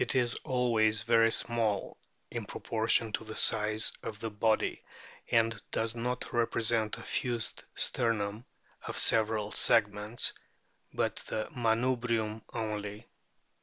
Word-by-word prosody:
is 120 -2 +2
always 115 -5 +2
very 115 -1 +4
small 110 -5 0 0.4
in - - -4
proportion 110 0 0
to 110 - -2
the 110 0 -8
size 110 0 +4
of 105 -2 -6
the 115 -1 -4
body 110 +1 0 0.5
and 115 -2 +2
does 115 0 -1
not 125 +1 -3
represent 115 -2 +1
a - - -10
fused 120 -3 -2
sternum 110 -2 0 0.4
of - - -4
several 110 -1 +3
segments, 105 +1 +2 0.6
but - - -1
the 110 0 -3
manubrium 115 -2 0
only. 105 -2 -5
110 Hz, 115 wpm, -30 LUFS, 110-115 Hz, 0.6 s, very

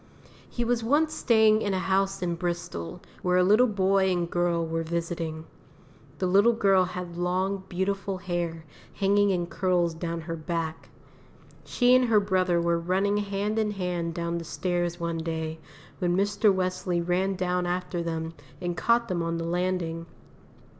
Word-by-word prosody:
He 240 - -2
was 235 -1 0
once 300 +6 +2
staying 220 -2 +4
in 200 -3 0
a - - +1
house 195 +1 0
in 175 -1 0
Bristol 170 - -4 0.2
where 180 0 +2
a 180 - +5
little 215 +7 +5
boy 195 -2 +2
and 175 -2 0
girl 170 -1 0
were 165 0 -2
visiting. 165 -1 -3 0.7
The 185 - -1
little 200 +6 +5
girl 195 -4 +3
had 180 -1 -6
long, 185 +2 -1
beautiful 195 +1 -2
hair 175 -3 -3 0.3
hanging 200 0 +3
in 180 -3 0
curls 175 -1 0
down 165 0 -4
her 165 +1 -5
back. 160 0 -4 0.8
She 245 0 +3
and 255 0 +5
her 225 -3 +4
brother 185 -3 +1
were 170 0 +1
running 190 +4 +1
hand 205 +1 -1
in 215 -1 +1
hand 180 -4 -3
down 170 0 -2
the - - -6
stairs 175 0 -2
one 170 -1 -2
day, 160 -1 -3 0.4
when 175 -2 +1
Mr. 205 +1 +3
Wesley 185 -1 -1
ran 180 +3 0
down 180 -1 -1
after 180 0 -2
them 165 -1 -3 0.3
and 175 -1 -3
caught 235 +7 +2
them 180 -4 -1
on 165 0 -1
the 165 - -3
landing. 170 -1 -2
180 Hz, 165 wpm, -27 LUFS, 170-195 Hz, 0.8 s, a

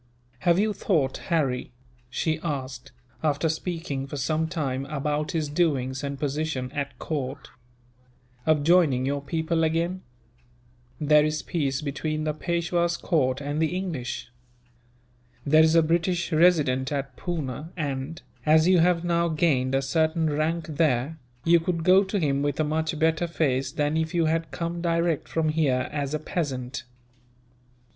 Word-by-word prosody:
"Have 170 +5 +3
you 210 +2 +2
thought, 160 -9 0
Harry," 130 -7 0 0.4
she 155 +5 -1
asked, 135 -5 -4 0.3
after 150 0 +1
speaking 160 -4 -3
for 145 - -6
some 155 +4 0
time 135 -5 -2
about 150 +2 -2
his 160 -2 0
doings 140 -5 0
and 140 -1 -4
position 145 -3 -2
at 140 -3 -4
court, 140 -2 -4 1.0
"of 155 -2 +3
joining 155 -6 +4
your 140 +1 -1
people 160 +3 -1
again? 170 +3 0 1.0
There 150 0 +5
is 155 0 -1
peace 140 -5 -1
between 155 +2 -2
the 155 -1 0
Peishwa's 170 +1 0
court 135 -6 0
and 145 +2 -2
the 160 +2 +1
English. 150 -10 -4 1.1
There 155 +2 +6
is 160 +1 +4
a 165 - +6
British 170 +2 0
Resident 150 -6 +3
at 135 -2 -3
Poona 155 -3 -4
and, 145 0 -4 0.2
as 155 +2 +5
you 185 -1 +5
have 170 0 +3
now 170 0 +2
gained 145 -5 +1
a 135 - +1
certain 160 +2 +1
rank 155 +2 0
there, 155 -1 0 0.2
you 170 +1 +5
could 165 0 -2
go 185 +3 +6
to 195 +1 -2
him 140 -6 +1
with 145 0 -1
a - - +3
much 160 +1 -1
better 160 +2 +1
face 135 -5 0
than 150 0 0
if 160 +2 -1
you 170 -1 +3
had 165 +1 0
come 170 0 -4
direct 170 -2 0
from 160 -1 0
here, 145 -5 +1
as 145 0 -2
a - - -2
peasant. 135 -7 -3
155 Hz, 150 wpm, -26 LUFS, 140-165 Hz, 1.1 s, There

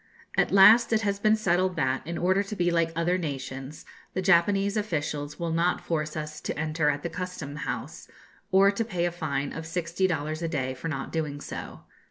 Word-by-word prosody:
At - - +2
last 215 +5 +7
it 220 - +3
has 200 -1 -1
been 215 +1 +4
settled 185 -3 +1
that, 130 -5 0
in 170 0 -3
order 185 +3 +2
to 205 +1 -5
be 175 -2 +1
like 165 -1 +1
other 175 +2 +1
nations, 135 -2 -6 0.3
the 185 - 0
Japanese 195 +3 +3
officials 150 -7 -2
will 170 -1 -2
not 170 +2 +1
force 155 -2 -3
us 155 0 -5
to - - -4
enter 155 -1 +1
at 145 -1 -2
the 170 - -2
Custom 180 -5 -5
House, - - -5 0.4
or 195 +1 +6
to 205 +3 -1
pay 180 -6 -1
a 175 - 0
fine 145 -5 -3
of 160 0 -6
sixty 170 +2 0
dollars 155 -2 -2
a 165 - -1
day 135 -5 -2
for 130 +5 -6
not 135 -4 -4
doing 150 -3 -2
so. - - -7
170 Hz, 205 wpm, -27 LUFS, 150-185 Hz, 0.4 s, last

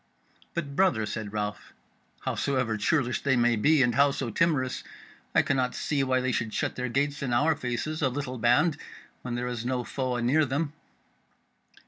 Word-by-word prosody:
"But, 145 -5 -3
brother," 140 - +3
said 105 -1 -5
Ralph, 105 -1 -4 0.5
"howsoever 130 -5 0
churlish 120 +3 +1
they 140 -2 +2
may 120 -1 +3
be, 145 +6 +4
and 120 -1 +2
howso 140 -2 +2
timorous, 145 -5 +1 0.5
I - - +6
cannot 130 -3 0
see 145 -2 0
why 130 -1 +1
they 130 0 0
should 115 -3 -2
shut - - -1
their 125 0 -3
gates 145 +4 0
in 135 -3 -2
our 150 +6 +3
faces, 130 +5 -3
a 135 - +3
little 130 -1 -4
band, 125 +8 +3 0.4
when 125 -1 -4
there 120 0 -2
is 120 -2 -3
no 125 0 -1
foe 130 0 -2
anear 125 +6 +3
them." 145 +2 -1
130 Hz, 170 wpm, -27 LUFS, 120-145 Hz, 0.5 s, I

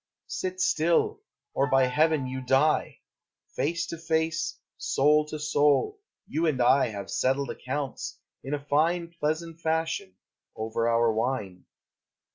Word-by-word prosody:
Sit 185 0 -4
still, 165 -2 +2 0.3
or 140 +1 +1
by 135 -1 +4
heaven, 150 +2 +2
you 130 +1 -4
die! 135 +5 +2 0.5
Face 170 +3 0
to 170 - -7
face, 160 0 -1 0.2
soul 150 +2 +2
to 155 - -5
soul, 150 - +2 0.3
you 165 +2 0
and 145 -5 0
I 130 +3 +4
Have 100 -3 -6
settled 135 +2 0
accounts, 135 +1 -4 0.3
in 140 +2 -2
a 145 -1 -8
fine 170 +4 +1
Pleasant 160 +2 -2
fashion, 160 - -1 0.4
over 115 +1 -1
our 115 -1 +3
wine. 110 -5 -2
145 Hz, 130 wpm, -27 LUFS, 130-160 Hz, 0.5 s, by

